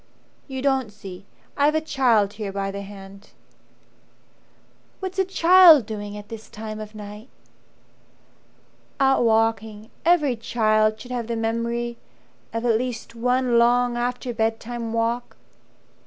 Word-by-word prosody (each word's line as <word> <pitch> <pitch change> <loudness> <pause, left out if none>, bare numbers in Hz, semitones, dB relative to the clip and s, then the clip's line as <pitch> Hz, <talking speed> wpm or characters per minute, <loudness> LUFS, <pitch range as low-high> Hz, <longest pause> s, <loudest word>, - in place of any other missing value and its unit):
"You 265 -2 -5
don't 265 -5 +1
see 195 -2 -11 0.3
I've 295 +2 +2
a - - +3
child 245 -10 +2
here 205 -2 -5
by 195 0 -3
the 200 0 -6
hand." 195 0 -12 1.7
"What's 380 0 -5
a - - +5
child 355 - +7
doing 205 -1 -6
at 205 0 -10
this 220 0 -10
time 215 0 -7
of 215 0 -9
night 210 +3 -10 0.9
?" - - -36
"Out 270 -2 +3
walking. 225 -1 0
Every 300 -6 +3
child 215 -1 +1
should 250 +3 -10
have 240 -2 -3
the 235 - -2
memory 235 +1 -2 0.5
Of 230 +1 -3
at 225 -2 +3
least 240 -2 -5
one 250 +1 +1
long 245 +1 +3
after 245 +1 -2
bedtime 225 +1 -2
walk. 230 +1 -2
230 Hz, 135 wpm, -23 LUFS, 215-250 Hz, 1.7 s, child